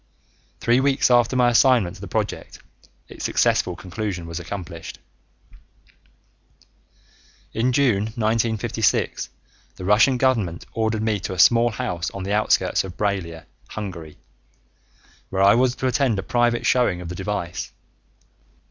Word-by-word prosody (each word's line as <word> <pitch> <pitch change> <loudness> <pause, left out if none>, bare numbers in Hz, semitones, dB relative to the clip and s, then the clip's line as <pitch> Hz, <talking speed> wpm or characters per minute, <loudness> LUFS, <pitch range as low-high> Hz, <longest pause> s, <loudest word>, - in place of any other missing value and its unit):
Three 120 +2 +3
weeks 135 -1 +2
after 120 +1 +3
my 125 -1 +4
assignment 120 -7 +4
to - - -14
the - - -7
project, - - -4 0.5
its - - -10
successful 90 - +1
conclusion 95 -1 -5
was 85 0 -6
accomplished. 85 -2 -7 2.6
In 120 +3 +1
June 120 -7 +2
1956, 110 -1 0 0.5
the 90 - -8
Russian 105 +6 +4
government 115 -10 0
ordered 110 -1 -1
me 110 -2 0
to 95 - -5
a - - -7
small 120 +5 +5
house 90 -5 -3
on 100 - -5
the 100 +2 -2
outskirts 105 +1 +2
of 95 -2 -9
Braila, 95 -6 -3 0.2
Hungary, 85 -7 -7 1.1
where 95 0 0
I 100 +1 +7
was 125 +2 +2
to - - -5
attend 130 -4 +1
a 95 - -3
private 120 +1 +1
showing 120 -8 +2
of 90 -2 -7
the - - -5
device. 95 -2 -4
105 Hz, 135 wpm, -22 LUFS, 90-120 Hz, 2.6 s, I